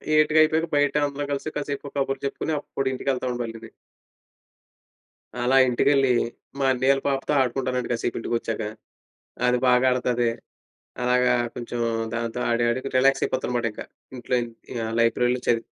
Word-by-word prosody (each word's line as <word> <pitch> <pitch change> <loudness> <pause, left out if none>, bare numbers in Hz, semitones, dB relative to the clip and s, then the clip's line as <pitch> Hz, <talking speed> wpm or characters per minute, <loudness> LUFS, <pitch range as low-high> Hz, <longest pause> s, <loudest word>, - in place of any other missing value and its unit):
ఎయిటుకయిపోయాక 155 +1 +4
బయట 145 0 +2
అందరం 145 0 -4
కలిసి 145 +2 -3
కాసేపు 140 -1 -5
కబుర్లు 135 0 -1
చెప్పుకొని, 155 +3 -3
అప్పుడు 135 -2 -4
ఇంటికెళ్తామండి 125 -2 -2
మళ్ళీని. 115 0 -8 1.7
అలా 130 +2 +3
ఇంటికెళ్ళి, 135 +2 +3 0.5
మా 140 - 0
అన్నయ్యోళ్ళ 135 +2 +2
పాపతో 135 +1 -1
ఆడుకుంటానండి 125 -1 -1
కాసేపు 120 0 -2
ఇంటికొచ్చాక. 115 -1 -2 0.9
అది 125 - +3
బాగాడతది. 125 -1 +3 0.7
అలాగా 125 0 +3 0.2
కొంచెం, 120 0 -4 0.4
దాంతో 115 +1 -3
ఆడి 120 0 +2
ఆడుగు 130 +3 -3
రిలాక్సయిపోతానుమాటింకా 125 -4 0 0.3
ఇంట్లో 125 +1 -3
ఇం 120 - -5 0.4
ఆహ్, 110 - -4
లైబ్రరీ‌లో 125 +2 +2
చదివి 115 -1 +2
125 Hz, 120 wpm, -24 LUFS, 120-135 Hz, 1.7 s, ఎయిటుకయిపోయాక